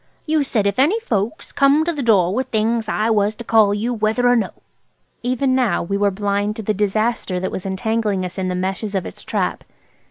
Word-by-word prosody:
"You 310 -1 +2
said 230 -7 0
if 200 +3 0
any 335 +12 +3
folks 225 - -3
come 285 +3 +3
to 340 - 0
the 295 - -4
door 195 -7 +3
with 260 +5 -1
things 220 0 0
I 215 +1 +1
was 210 0 +2
to 235 - -8
call 220 -3 +4
you, 220 +4 -1
whether 220 +2 +1
or 245 - +5
no." 230 - +1 0.7
Even 255 +2 0
now 255 -4 +1
we 195 +4 -2
were 200 0 +2
blind 205 +1 -1
to 220 - -6
the 215 - 0
disaster 210 -1 0
that 185 - -3
was 190 - -5
entangling 205 0 -1
us 180 +2 -6
in 185 - -1
the 180 - -2
meshes 195 +3 -3
of 190 - -1
its - - -9
trap. - - -2
215 Hz, 220 wpm, -20 LUFS, 200-245 Hz, 0.7 s, or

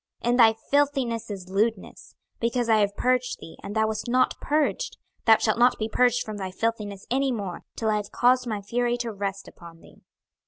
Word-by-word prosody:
26:024:013 240 - 0
In 245 - +2
thy 225 -2 +7 0.2
filthiness 275 -6 +1
is 190 -3 -7
lewdness: 210 +1 -2 0.2
because 235 0 0
I 220 - +5
have 205 -1 +1
purged 250 0 +1
thee, 165 - -11
and 205 - -7
thou 220 0 +3
wast 220 +2 -3
not 255 +1 +2
purged, 310 +12 0 0.3
thou 225 -1 +7
shalt 215 +1 0
not 245 +1 +4
be 215 - -2
purged 245 +2 +2
from 215 -1 -6
thy 190 -2 -4
filthiness 205 0 -3
any 270 +1 +1
more, 200 -7 -5
till 220 -1 0
I 210 - +2
have 205 -1 -5
caused 250 0 +3
my 210 -3 -3
fury 240 +3 0
to 240 -1 -3
rest 195 -1 -4
upon 170 -1 -14
thee. - - -19
225 Hz, 205 wpm, -25 LUFS, 205-245 Hz, 0.3 s, thy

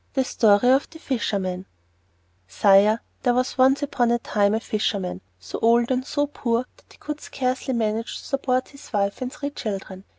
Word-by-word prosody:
The 265 - +3
Story 220 -1 +3
of 270 +2 +2
the 330 - -12
Fisherman 195 - -2 0.8
Sire, 200 - +4 0.2
there 245 -2 +2
was 255 +1 -1
once 265 +3 +4
upon 245 -4 +1
a 235 - +3
time 205 -3 +1
a - - 0
fisherman 200 - -2 0.2
so 95 - -7
old 235 +2 +3
and 255 0 +1
so 290 +2 0
poor 245 -4 -1
that - - -22
he - - -19
could 300 0 -6
scarcely 260 0 -2
manage 225 0 -1
to - - -11
support 255 -2 -1
his 280 0 -14
wife 200 -1 -1
and 255 0 -3
three 290 -1 -5
children. 195 -6 -6
235 Hz, 185 wpm, -23 LUFS, 205-260 Hz, 0.8 s, Sire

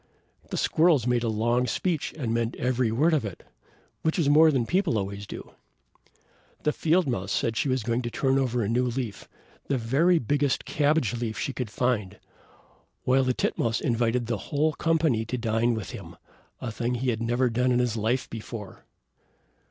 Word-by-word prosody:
The - - -3
squirrels 160 -7 +3
made 125 -1 +2
a 115 - 0
long 120 +3 +1
speech, 170 -1 -1
and 120 -7 -2
meant 115 0 -1
every 125 -2 0
word 150 +9 +3
of 150 - +2
it, 100 -5 -7 0.6
which 160 - 0
is 155 -5 +2
more 155 +2 +7
than 130 -6 +1
people 180 - +1
always 100 0 -4
do; - - -8 1.1
the 150 - +1
field 170 +3 +2
mouse 100 -8 -2
said - - +1
that - - -7
she 140 - +1
was 130 -3 0
going 115 +2 0
to 120 - -3
turn 135 +2 +1
over 125 -3 0
a - - -1
new 120 +3 +1
leaf, 120 -3 -4 0.4
the 140 - +1
very 140 +10 +3
biggest 145 0 0
cabbage 145 -5 +1
leaf 115 -2 -3
she 135 - -2
could 125 -4 -4
find; 110 -4 -1 0.9
while 130 +1 +3
the 130 -1 0
titmouse 115 -1 0
invited 120 -1 0
the 115 -1 -1
whole 155 +1 +1
company 160 -9 +1
to 125 +3 -3
dine 115 0 +1
with 110 -5 -5
him, - - -9 0.4
a 120 - -4
thing 120 +3 -2
he 125 +1 0
had 110 0 -3
never 120 +2 +1
done 125 +2 +1
in 120 - +3
his 125 -2 +1
life 115 +4 0
before. 110 -3 -8
125 Hz, 190 wpm, -26 LUFS, 115-140 Hz, 1.1 s, more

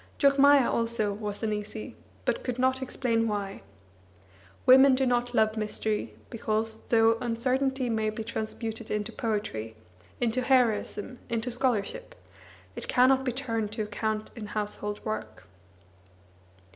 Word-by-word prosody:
Jogmaya 280 -1 +6
also 230 -3 0
was 205 +1 -5
uneasy, 215 0 -4 0.3
but - - 0
could 250 -2 -3
not 260 +1 +2
explain 230 -3 0
why. 200 -2 -3 1.0
Women 265 +1 +8
do 265 +1 +1
not 245 0 0
love 215 0 +3
mystery, 215 0 -2 0.2
because, 220 -1 -1
though 225 0 +4
uncertainty 255 +2 0
may 220 -2 0
be 215 +1 -5
transmuted 225 0 -4
into 210 +1 -2
poetry, 205 - -3 0.4
into 245 +1 +1
heroism, 250 -2 +1
into 230 +1 -2
scholarship, 240 -5 -1 0.6
it - - -5
cannot 260 +1 +4
be 255 - 0
turned 230 -4 -2
to 220 - -2
account 215 +1 -3
in 220 -3 -6
household 210 0 -3
work. 215 0 -5
225 Hz, 125 wpm, -28 LUFS, 215-255 Hz, 1.0 s, Women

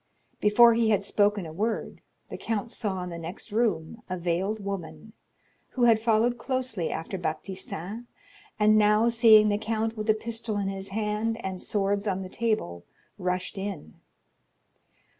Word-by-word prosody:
Before 230 +3 +6
he 230 -1 +2
had 200 -2 +2
spoken 205 -2 +1
a 160 - -8
word, 215 +6 -3 0.3
the - - -5
count 225 0 -3
saw 190 -5 -2
in 180 - -6
the 170 - -6
next 175 +7 -7
room 215 -2 -1
a 185 - -2
veiled 180 +5 -1
woman, 200 +1 -6 0.6
who 250 - 0
had 230 -2 +6
followed 230 +2 +2
closely 255 - -2
after 170 +4 -4
Baptistin, 190 +4 -5 0.5
and 215 0 +5
now, 210 +2 +4
seeing 225 -2 +6
the 205 0 0
count 220 0 -2
with 215 0 -5
a 215 - +5
pistol 225 -1 -3
in 200 -1 -1
his 195 0 -6
hand 215 +2 -1
and 190 -1 -4
swords 200 0 -1
on 190 -1 -1
the 185 - -8
table, 215 - -1 0.4
rushed 180 +1 -2
in. 190 - -6
210 Hz, 160 wpm, -27 LUFS, 190-225 Hz, 0.6 s, Before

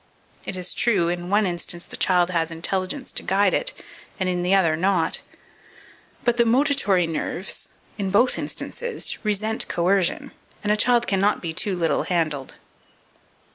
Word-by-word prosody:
It 185 - -4
is 180 0 -1
true, 195 -8 +2
in 175 0 -3
one 205 +2 +3
instance 175 -1 -2
the - - -4
child 180 -1 +2
has 165 -2 0
intelligence 185 - -3
to - - 0
guide 195 0 +2
it, - - 0 0.5
and 190 - 0
in 180 -1 0
the 180 +2 +3
other 165 -5 +3
not; 175 -1 +1 1.0
but 240 0 +2
the 235 - +5
motitory 235 - +3
nerves, 165 +3 -4 0.3
in 195 -1 -1
both 230 +6 +3
instances, 480 0 -4
resent 215 +1 0
coercion, 195 - +1 0.3
and 210 - +1
a - - +4
child 240 +2 +3
cannot 200 0 +2
be 165 -2 -4
too 190 +3 -1
little 170 -2 +1
handled. 155 -6 -2
190 Hz, 155 wpm, -23 LUFS, 175-215 Hz, 1.0 s, the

